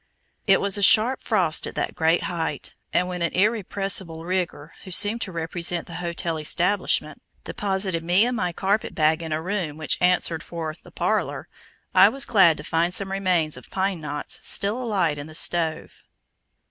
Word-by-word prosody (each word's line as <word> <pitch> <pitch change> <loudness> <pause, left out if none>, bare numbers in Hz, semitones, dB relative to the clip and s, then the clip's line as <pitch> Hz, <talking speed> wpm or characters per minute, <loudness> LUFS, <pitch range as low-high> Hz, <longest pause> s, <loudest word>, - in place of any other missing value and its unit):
It 195 -1 +5
was 200 +1 0
a - - -3
sharp 225 +6 +5
frost 180 -8 +1
at - - -8
that - - -2
great 165 0 +2
height, 165 -2 -4 0.2
and 180 - +1
when 180 -1 -5
an 170 - 0
"irrepressible 195 -5 -1
nigger," 175 -4 -3
who 190 - -10
seemed 205 +5 +4
to 195 - -2
represent 170 +1 -1
the 170 - -8
hotel 170 -1 -2
establishment, 180 +6 0 0.2
deposited 190 -4 -2
me 180 +6 +4
and 250 0 -1
my 180 -6 -1
carpetbag 170 -4 0
in 165 -1 -6
a 155 +1 -2
room 180 -6 -3
which 155 -2 0
answered 180 -2 +2
for 165 -2 -5
"the - - -15
parlor," - - -2 0.5
I - - +7
was 275 0 -3
glad 190 -8 +5
to 150 - -8
find 170 +3 0
some 195 -1 -2
remains 180 -5 0
of - - -13
pine 190 -3 -2
knots 150 -1 -4
still 205 +5 0
alight 185 -11 0
in 145 - -7
the 155 - -6
stove. 165 -1 -1
180 Hz, 175 wpm, -24 LUFS, 165-195 Hz, 0.5 s, I